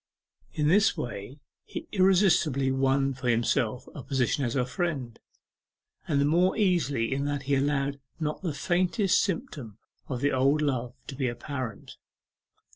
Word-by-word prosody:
In 150 -1 0
this 205 +7 +4
way 120 +2 -6 0.3
he - - -7
irresistibly 175 -8 +3
won 135 +1 +1
for 130 -1 -5
himself 120 +1 0
a 145 - -7
position 135 +1 0
as 120 0 -1
her 125 -2 +1
friend, 130 -4 -3 0.9
and 145 -4 +1
the 140 - +3
more 175 +5 +3
easily 145 - +1
in 140 +1 -1
that 145 -1 -2
he 140 +1 -1
allowed 140 0 0 0.2
not 150 -1 -3
the 175 -4 -2
faintest 180 - +1
symptom 155 - -4 0.3
of 130 -3 -3
the 145 0 +2
old 135 +3 +3
love 125 -3 -1
to 135 - -7
be 130 -1 -1
apparent. 120 -2 -6
140 Hz, 150 wpm, -27 LUFS, 130-160 Hz, 0.9 s, this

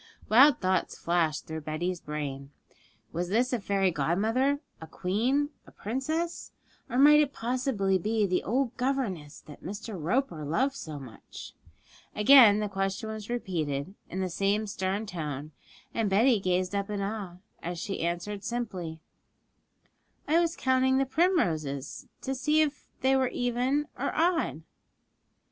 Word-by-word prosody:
Wild 255 +4 +7
thoughts 185 -1 0
flashed 165 -3 0
through 160 0 -5
Betty's 165 +4 -3
brain. 140 -2 -5 0.6
Was 175 +1 -2
this 245 +6 +1
a 245 - +1
fairy 195 -2 +1
godmother, 220 - +1 0.2
a 160 - -8
queen, 245 - 0 0.2
a - - -14
princess? 310 +10 -3 0.4
Or 245 - -2
might 295 +2 +8
it 290 -2 +2
possibly 230 -6 0
be 215 +3 +1
the 185 -2 +1
old 245 +2 -1
governess 230 - -2
that 150 - -14
Mr. 205 +3 -6
Roper 175 - 0
loved 255 - +1
so 155 - -7
much? 130 -5 -11 0.6
Again 215 -1 +8
the 210 - 0
question 195 +2 -2
was 215 0 -6
repeated, 170 -8 -2 0.2
in 190 - -3
the 185 - -1
same 200 +4 +1
stern 195 +1 -2
tone, 155 -6 -5 0.4
and 225 -3 0
Betty 220 +4 +4
gazed 185 0 0
up 200 0 -1
in 205 -1 -2
awe, 200 -3 -4 0.3
as 175 +1 -4
she 195 +3 -4
answered 175 +4 -3
simply, 190 -10 -4 1.3
'I 320 +3 +4
was 340 -1 +1
counting 260 0 +2
the 270 - +2
primroses, 175 - 0 0.2
to 265 - -2
see 300 +4 +2
if 295 -1 -2
they 265 +1 +4
were 260 -1 +3
even 250 +4 0
or - - 0
odd.' 330 - +1
205 Hz, 145 wpm, -28 LUFS, 175-260 Hz, 1.3 s, might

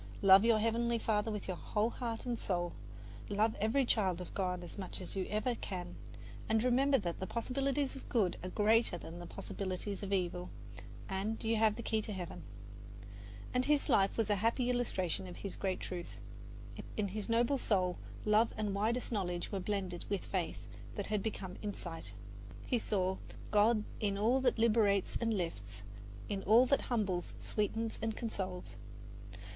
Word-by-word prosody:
Love 195 +1 +9
your 230 -1 +5
Heavenly 230 +2 +1
Father 220 -1 +1
with 210 -2 -4
your 185 -2 -2
whole 215 +6 0
heart 230 -2 -4
and 240 -2 -1
soul, 175 -2 -1 0.6
love 215 +2 +2
every 225 +6 +3
child 190 -7 +2
of 180 - -7
God 180 -2 -1
as 175 - -9
much 190 -3 -5
as 185 - -7
ever 210 +5 0
you - - -2
can, 180 -3 -5 0.5
and 220 0 +3
remember 270 +3 +4
that 175 -7 -3
the 190 - -3
possibilities 270 +3 -1
of 270 - -10
good 205 -7 +2
are 185 - -4
greater 215 0 +3
than 170 0 -8
the 175 - -7
possibilities 195 +2 -4
of 200 -1 -4
evil; 180 -2 0 0.6
and 200 +4 -2
you 225 0 +2
have 215 -1 +4
the 235 - -6
key 220 0 +1
to 210 - -5
Heaven." 180 -3 -5 1.1
And 250 0 +2
his 295 -1 +2
life 195 0 +4
was 220 -2 +1
a 205 - +3
happy 235 +4 +2
illustration 190 -7 -1
of 180 - -9
this 200 - -4
great 190 -2 -1
truth. 175 -2 -6 0.8
In 205 -2 0
his 210 +3 -5
noble 235 +4 +3
soul 185 -6 +1 0.3
love 215 +2 +4
and 210 -2 -1
widest 225 +6 0
knowledge 180 -5 -2
were 195 - -1
blended 185 -2 -2
with 200 -2 -1
faith 185 -4 -2 0.3
that 205 - -2
had 210 -1 0
become 190 -3 -4
insight. 170 - -5 0.5
He 245 - +1
saw 190 -3 0 0.3
God 215 +1 +4 0.2
in 200 -2 0
all 235 +6 +3
that 250 -2 +2
liberates 215 -4 +3
and 230 -1 +1
lifts, 105 - -3 0.4
In 200 -1 -2
all 225 +6 +6
that 275 +2 +3
humbles, 195 -7 0
sweetens 225 +1 -1
and 225 -1 -2
consoles. 190 -6 -4
210 Hz, 175 wpm, -34 LUFS, 185-230 Hz, 1.1 s, Love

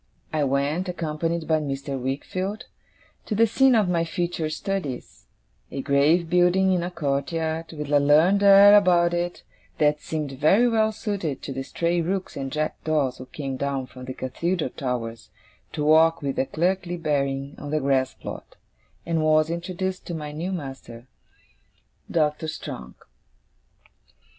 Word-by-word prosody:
I 155 -1 +1
went, 140 +7 0
accompanied 165 -1 -2
by 160 -1 +3
Mr. 135 -2 -4
Wickfield, 185 +10 -3 0.6
to 215 - -1
the 230 +2 +5
scene 260 +3 +4
of 215 -4 +3
my 170 -2 +1
future 170 -1 -2
studies 155 -6 -5 0.4
a 135 - -5
grave 155 +5 +3
building 180 +2 +3
in 180 - +1
a 175 - -3
courtyard, 160 +1 -2
with 150 -2 -6
a 145 - +5
learned 155 +8 +4
air 200 +1 +8
about 175 -4 +4
it 175 0 -2 0.3
that 150 0 +2
seemed 155 -3 -4
very 155 - +4
well 220 -2 +2
suited 200 -9 -4
to 135 - -5
the 135 - -4
stray 170 +5 -1
rooks 185 +3 -3
and 135 -1 -4
jackdaws 155 -3 -1
who 130 - -9
came 135 -1 -5
down 140 -1 -2
from 125 0 -11
the 130 0 -6
Cathedral 160 +3 -2
towers 115 -3 -4 0.4
to 150 - -2
walk 160 +1 +4
with 140 -1 -2
a 135 - +1
clerkly 175 +1 -1
bearing 140 -3 -1
on 145 - -7
the 155 +1 0
grass 135 -2 +1
plot - - -9 0.5
and 165 -1 0
was 155 +1 +3
introduced 185 +2 -4
to 175 - -4
my 150 -2 -5
new 165 +5 -4
master, 135 -8 -7 1.0
Doctor 155 -1 0
Strong. 65 - -7
155 Hz, 155 wpm, -24 LUFS, 140-175 Hz, 1.0 s, air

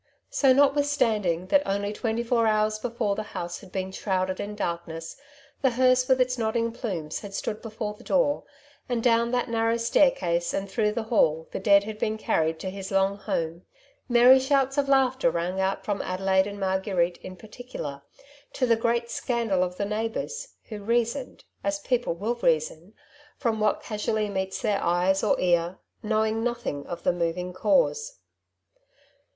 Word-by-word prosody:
So, 270 -2 +4
notwithstanding 255 - +2
that 290 - +5
only 200 -1 -2
twenty 225 +1 -2
four 230 -1 +2
hoars 215 0 +1
before 230 -3 -1
the 215 - -3 0.2
house 175 0 -4
had 190 -3 -15
been 190 0 -3
shrouded 185 -1 -1
in 205 +1 -4
darkness, 170 -4 -4 0.5
the 265 - +4
hearse 255 +1 +3
with 260 -1 +3
its 250 0 +1
nodding 230 +1 0
plumes 185 - -4
had 200 -2 -8
stood 210 +1 -3
before 215 -2 -5
the 210 - -16
door, 285 +1 +2 0.5
and 240 -2 -1
down 235 -1 +3
that 245 0 0
narrow 230 0 +1
staircase 180 -8 +2
and 195 0 -2
through 210 0 +1
the 230 - -2
hall 160 -8 +2
the - - -4
dead 200 +1 +5
had 215 0 -7
been 215 0 -1
carried 160 -6 0
to 190 - -4
his 195 0 -7
long 195 0 +2
home 170 -3 -3 0.2
— - - -36
merry 245 +2 +7
shouts 270 0 +1
of 275 -1 0
laughter 260 -1 +3
rang 180 -1 -2
out 190 +1 -1
from 205 -2 -1
Adelaide 190 +1 +1
and 200 0 -7
Marguerite 190 -2 0
in 185 - -9
particular, 210 - -8 0.5
to 255 - +1
the 235 -2 +4
great 235 +1 0
scandal 230 -7 0
of 180 0 -4
the 200 - -1
neighbours, 225 - -4
who 215 -2 -6
reasoned 235 +4 -1
— - - -42
as 295 0 0
people 245 - -1
will 210 +7 -1
reason 165 -2 -1 0.2
— 295 0 -26
from 225 -4 -1
what 215 -1 +1
casually 210 0 -1
meets 190 -1 -3
their 205 -2 +1
eye 175 +2 +3
or - - +2
ear, 175 0 +1 0.2
knowing 220 +1 0
nothing 235 -12 -3
of 175 -1 -6
the - - +2
moving 175 +1 -2
cause. - - +1
215 Hz, 175 wpm, -26 LUFS, 190-240 Hz, 0.5 s, merry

